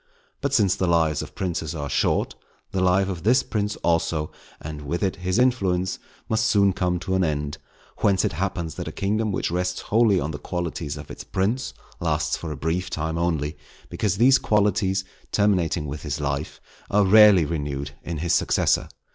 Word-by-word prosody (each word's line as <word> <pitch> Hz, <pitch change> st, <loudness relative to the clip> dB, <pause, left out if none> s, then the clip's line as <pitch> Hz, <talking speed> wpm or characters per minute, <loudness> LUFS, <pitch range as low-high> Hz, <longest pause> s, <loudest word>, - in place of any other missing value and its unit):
But 140 Hz, -1 st, -1 dB
since 105 Hz, -9 st, +3 dB
the 95 Hz, -, -1 dB
lives 80 Hz, -3 st, +2 dB
of -, -, -9 dB
princes 85 Hz, -4 st, -3 dB
are 70 Hz, -2 st, -4 dB
short, 65 Hz, -, +1 dB, 0.4 s
the 95 Hz, -, -1 dB
life 95 Hz, +1 st, +3 dB
of 90 Hz, -4 st, -4 dB
this 120 Hz, +8 st, +3 dB
prince, 105 Hz, -1 st, -2 dB
also, 80 Hz, -2 st, 0 dB, 0.3 s
and 75 Hz, -1 st, -7 dB
with 85 Hz, +7 st, -3 dB
it 95 Hz, -, 0 dB
his 90 Hz, +2 st, -1 dB
influence, 95 Hz, -8 st, +1 dB, 0.3 s
must 110 Hz, 0 st, +1 dB
soon 100 Hz, -3 st, +4 dB
come 90 Hz, -1 st, 0 dB
to 95 Hz, -, -2 dB
an 95 Hz, 0 st, +2 dB
end; 75 Hz, -3 st, -2 dB, 0.4 s
whence 100 Hz, -1 st, +2 dB
it 100 Hz, -, -1 dB
happens 85 Hz, -1 st, -2 dB
that -, -, -6 dB
a -, -, -4 dB
kingdom 105 Hz, +2 st, -1 dB
which 95 Hz, -, -1 dB
rests 90 Hz, +1 st, -1 dB
wholly 110 Hz, -3 st, +3 dB
on 80 Hz, +1 st, -2 dB
the 75 Hz, -, -6 dB
qualities 85 Hz, -4 st, -4 dB
of 70 Hz, -, -9 dB
its -, -, -8 dB
prince, 110 Hz, +7 st, -1 dB, 0.2 s
lasts 80 Hz, -2 st, 0 dB
for 80 Hz, -, -6 dB
a 75 Hz, -, -5 dB
brief 80 Hz, +5 st, -2 dB
time 80 Hz, +1 st, -2 dB
only; 80 Hz, -3 st, -1 dB, 0.3 s
because 100 Hz, -3 st, -1 dB
these 130 Hz, +5 st, +6 dB
qualities, 100 Hz, -2 st, +1 dB, 0.3 s
terminating 90 Hz, -6 st, +1 dB
with 75 Hz, +1 st, -5 dB
his 70 Hz, 0 st, -3 dB
life, 70 Hz, +1 st, -3 dB, 0.3 s
are 105 Hz, 0 st, +3 dB
rarely 105 Hz, -3 st, +7 dB
renewed 70 Hz, -3 st, -3 dB
in 85 Hz, -1 st, -5 dB
his 85 Hz, +3 st, 0 dB
successor. -, -, +2 dB
90 Hz, 185 wpm, -24 LUFS, 80-100 Hz, 0.4 s, rarely